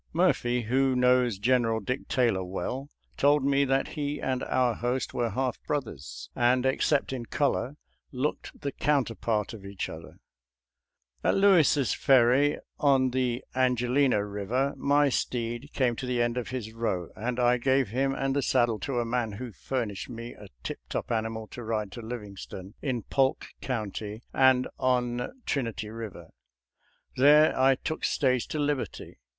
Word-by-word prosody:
Murphy, 120 Hz, 0 st, +2 dB
who 130 Hz, +3 st, +2 dB
knows 125 Hz, -3 st, +3 dB
General 115 Hz, 0 st, +2 dB
Dick 125 Hz, +5 st, -4 dB
Taylor 115 Hz, -7 st, +1 dB
well, 95 Hz, +10 st, -4 dB, 0.3 s
told 145 Hz, 0 st, +4 dB
me 140 Hz, 0 st, +3 dB
that 135 Hz, 0 st, +1 dB
he 145 Hz, -2 st, -3 dB
and 130 Hz, -1 st, -1 dB
our 125 Hz, -2 st, +2 dB
host 125 Hz, +3 st, -2 dB
were 120 Hz, -1 st, 0 dB
half 130 Hz, +1 st, -2 dB
brothers, 125 Hz, -, -4 dB
and 125 Hz, +1 st, +3 dB
except 135 Hz, +1 st, +1 dB
in 125 Hz, -2 st, -4 dB
color 140 Hz, -2 st, 0 dB, 0.4 s
looked 135 Hz, +3 st, -3 dB
the 140 Hz, -, -2 dB
counterpart 115 Hz, -7 st, 0 dB
of 105 Hz, -3 st, -10 dB
each 100 Hz, -1 st, -5 dB
other. 80 Hz, -, -7 dB
» -, -, -14 dB
• -, -, -11 dB
• -, -, -22 dB, 1.1 s
At -, -, +3 dB
Lewis' 175 Hz, -9 st, +4 dB
Ferry 135 Hz, +3 st, +4 dB, 0.2 s
on 135 Hz, -3 st, +3 dB
the 125 Hz, -1 st, -1 dB
Angelina 130 Hz, +1 st, +2 dB
Eiver 105 Hz, +7 st, -1 dB
my 145 Hz, 0 st, +3 dB
steed 120 Hz, +1 st, -2 dB
came 125 Hz, -3 st, +1 dB
to 130 Hz, -, -4 dB
the 125 Hz, -1 st, 0 dB
end 120 Hz, 0 st, +1 dB
of 125 Hz, -2 st, -3 dB
his 120 Hz, -4 st, -5 dB
row, 95 Hz, -7 st, -2 dB
and 120 Hz, +2 st, -3 dB
I 125 Hz, 0 st, +3 dB
gave 130 Hz, -2 st, +2 dB
him 135 Hz, +4 st, 0 dB
and 135 Hz, 0 st, -1 dB
the 140 Hz, -, +2 dB
saddle 120 Hz, -5 st, +2 dB
to 130 Hz, -3 st, -2 dB
a 120 Hz, -, 0 dB
man 115 Hz, -2 st, -1 dB
who 120 Hz, +4 st, -6 dB
furnished 110 Hz, -2 st, -4 dB
me 115 Hz, 0 st, -7 dB
a 105 Hz, -, -12 dB, 0.2 s
tiptop -, -, -5 dB
animal 110 Hz, -1 st, -2 dB
to 120 Hz, -, -8 dB
ride 110 Hz, -3 st, -2 dB
to 120 Hz, -, -8 dB
Livingstone 105 Hz, -4 st, -8 dB
in 125 Hz, -5 st, -2 dB
Polk 135 Hz, -1 st, +1 dB, 0.2 s
County, 110 Hz, -2 st, -4 dB
and 130 Hz, -1 st, +4 dB
on 125 Hz, -1 st, 0 dB, 0.2 s
Trinity 115 Hz, -6 st, -2 dB
Eiver. 110 Hz, -7 st, -8 dB, 0.9 s
There 150 Hz, +4 st, +6 dB
I 135 Hz, +1 st, +4 dB
took 160 Hz, +4 st, -5 dB
stage 130 Hz, -4 st, +1 dB
to -, -, -4 dB
Liberty. 145 Hz, -, -3 dB
125 Hz, 160 wpm, -28 LUFS, 115-135 Hz, 1.1 s, There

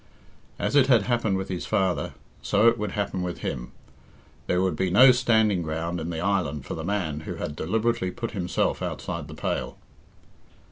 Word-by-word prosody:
As -, -, -1 dB
it 135 Hz, -2 st, +6 dB
had 120 Hz, -6 st, +5 dB
happened 110 Hz, -3 st, +1 dB
with 95 Hz, -, -4 dB
his 90 Hz, -2 st, -4 dB
father, 95 Hz, -4 st, 0 dB, 0.3 s
so 105 Hz, +4 st, +3 dB
it 115 Hz, 0 st, +4 dB
would 105 Hz, -2 st, -3 dB
happen 100 Hz, -3 st, -2 dB
with 90 Hz, -1 st, -4 dB
him -, -, -4 dB, 0.8 s
there 90 Hz, -, +2 dB
would 95 Hz, -3 st, +1 dB
be 95 Hz, +4 st, 0 dB
no 125 Hz, +8 st, +8 dB
standing 110 Hz, -6 st, +3 dB
ground 80 Hz, +2 st, -3 dB
in 80 Hz, +1 st, -4 dB
the 80 Hz, -2 st, -3 dB
island 80 Hz, -7 st, -1 dB
for -, -, -5 dB
the 80 Hz, -, -5 dB
man 90 Hz, -5 st, -2 dB
who 75 Hz, -, -6 dB
had 75 Hz, -, -5 dB
deliberately 110 Hz, +5 st, 0 dB
put 115 Hz, +5 st, -5 dB
himself 90 Hz, -4 st, -1 dB
outside -, -, -4 dB
the -, -, -9 dB
pale. -, -, -3 dB
95 Hz, 185 wpm, -26 LUFS, 85-110 Hz, 0.8 s, no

